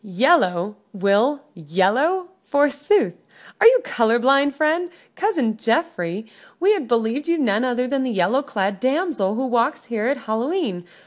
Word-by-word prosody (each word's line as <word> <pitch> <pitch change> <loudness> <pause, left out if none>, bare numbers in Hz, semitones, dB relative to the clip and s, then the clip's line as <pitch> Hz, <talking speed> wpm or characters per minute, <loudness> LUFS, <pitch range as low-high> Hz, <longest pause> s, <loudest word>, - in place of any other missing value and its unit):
"Yellow, 200 - +1 0.2
Will, 205 +9 +1
yellow, 205 - 0
forsooth? 290 +7 +1 0.5
Are - - +7
you - - +6
color 235 - +1
blind, 275 +3 +2
friend? 315 +4 0 0.3
Cousin 310 - 0
Geoffrey, 220 - -2 0.3
we 390 +5 +4
had 345 - -3
believed 235 +5 -1
you 335 0 +1
none 225 -6 +1
other 250 0 -1
than 275 +1 -1
the 260 - -2
yellow 210 +5 +1
clad 200 -8 -3
damsel 260 - -1
who 260 +3 -2
walks 245 +2 0
here 220 0 -1
at 280 +2 0
Hallow 225 +6 -2
e'en. 195 - -3
250 Hz, 150 wpm, -21 LUFS, 210-295 Hz, 0.5 s, Are